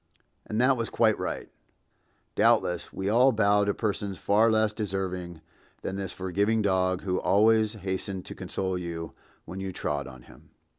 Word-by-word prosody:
And 110 Hz, -, -2 dB
that 130 Hz, +1 st, +4 dB
was 115 Hz, -1 st, -2 dB
quite 110 Hz, -2 st, +3 dB
right. -, -, -4 dB, 0.9 s
Doubtless 90 Hz, -1 st, +2 dB
we 95 Hz, -, -4 dB
all 125 Hz, +6 st, +5 dB
bow 105 Hz, -2 st, +3 dB
to 100 Hz, -, +1 dB
persons 100 Hz, -3 st, -2 dB
far 110 Hz, +3 st, +3 dB
less 110 Hz, -1 st, +2 dB
deserving 95 Hz, -5 st, -4 dB, 0.4 s
than 95 Hz, -, -3 dB
this 95 Hz, -1 st, -3 dB
forgiving 100 Hz, +4 st, 0 dB
dog 95 Hz, -2 st, +1 dB
who 90 Hz, -2 st, 0 dB
always 110 Hz, +1 st, +3 dB
hastened 95 Hz, -2 st, -4 dB
to -, -, -7 dB
console 95 Hz, -1 st, -3 dB
you 85 Hz, -2 st, -6 dB, 0.3 s
when 90 Hz, +3 st, -7 dB
you 95 Hz, 0 st, -4 dB
trod 75 Hz, -5 st, -3 dB
on 65 Hz, -2 st, -12 dB
him. -, -, -18 dB
100 Hz, 160 wpm, -27 LUFS, 90-110 Hz, 0.9 s, all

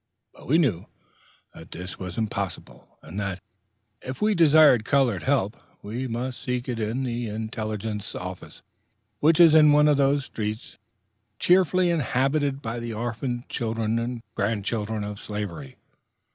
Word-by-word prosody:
But -, -, -15 dB
we 155 Hz, -, +4 dB
knew 125 Hz, -, +1 dB, 0.7 s
that 80 Hz, -, -13 dB
this 90 Hz, +2 st, -8 dB
was 90 Hz, -2 st, -6 dB
impossible, 100 Hz, -4 st, -5 dB
and 100 Hz, -, -7 dB
that, 100 Hz, -2 st, -3 dB, 0.6 s
if 130 Hz, +1 st, -6 dB
we 210 Hz, 0 st, +2 dB
desired 155 Hz, -, +6 dB
colored 125 Hz, -, +2 dB
help, 75 Hz, -, +1 dB, 0.3 s
we 120 Hz, +6 st, -4 dB
must 125 Hz, +2 st, -4 dB
seek 125 Hz, 0 st, -3 dB
it 120 Hz, -3 st, -3 dB
at 110 Hz, +1 st, -2 dB
the 120 Hz, -2 st, -3 dB
intelligence 110 Hz, -1 st, -4 dB
office, 90 Hz, 0 st, -8 dB, 0.6 s
which 160 Hz, +2 st, +4 dB
is 165 Hz, -3 st, +8 dB
in 150 Hz, -2 st, +7 dB
one 150 Hz, 0 st, +5 dB
of 145 Hz, -2 st, +4 dB
those 140 Hz, 0 st, +2 dB
streets 110 Hz, 0 st, -5 dB, 0.6 s
chiefly 180 Hz, +1 st, +3 dB
inhabited 140 Hz, -1 st, 0 dB
by 115 Hz, +1 st, -3 dB
the 115 Hz, -1 st, -5 dB
orphaned 120 Hz, +2 st, -4 dB
children 115 Hz, 0 st, -1 dB
and 120 Hz, 0 st, -4 dB
grandchildren 105 Hz, +1 st, -2 dB
of 105 Hz, -1 st, -6 dB
slavery. 100 Hz, -10 st, -6 dB
115 Hz, 145 wpm, -25 LUFS, 105-140 Hz, 0.7 s, is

